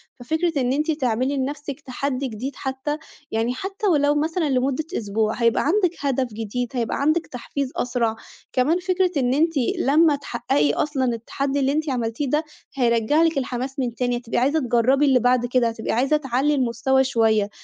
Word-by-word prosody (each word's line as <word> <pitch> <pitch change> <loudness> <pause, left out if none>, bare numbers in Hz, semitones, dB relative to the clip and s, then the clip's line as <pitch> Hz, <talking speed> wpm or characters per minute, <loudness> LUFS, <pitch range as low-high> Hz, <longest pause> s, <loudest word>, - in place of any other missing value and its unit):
ففكرة 315 +4 -1
إن 250 +1 +1
أنتِ 305 +3 0
تعملي 260 -1 0
لنفسِك 285 +1 -4
تحدّي 270 0 -3
جديد 250 +4 -5
حتى، 265 +2 -3 0.3
يعني 225 +2 0
حتى 390 +8 -3
ولو 290 -4 +3
مثلًا 315 +1 0
لمدة 265 +3 0
أسبوع 215 +1 -1
هيبقى 235 -1 +2
عَندِك 360 +1 +2
هدف 265 -4 -1
جديد، 225 +3 -3
هيبقى 235 -3 -1
عَندِك 310 +4 +1
تحفيز 260 +2 -4
أسرع، 235 -2 0 0.4
كمان 295 +8 +2
فكرة 365 0 +1
إن 250 -2 +2
أنتِ 325 +4 +2 0.3
لما 300 +3 +4
تحقّقي 235 - 0
أصلًا 280 - 0
التحدّي 270 +4 -2
اللي 270 0 +2
أنتِ 310 +1 -1
عملتيه 245 +2 -2
ده، 300 +4 +1 0.3
هيرجّع 240 +4 +2
لِك 325 -3 +1
الحماس 260 +1 -3
من 245 -3 -2
تاني، 245 0 0
هتبقي 240 -1 -4
عايزة 280 +6 +2
تجرّبي 255 +2 +2
اللي 265 -3 +4
بعد 245 0 +2
كده، 245 -1 +2
هتبقي 225 -1 -4
عايزة 270 +6 +2
تعلّي 275 +1 0
المستوى 260 +1 +2
شوية 220 -5 +2
265 Hz, 170 wpm, -23 LUFS, 240-295 Hz, 0.4 s, لما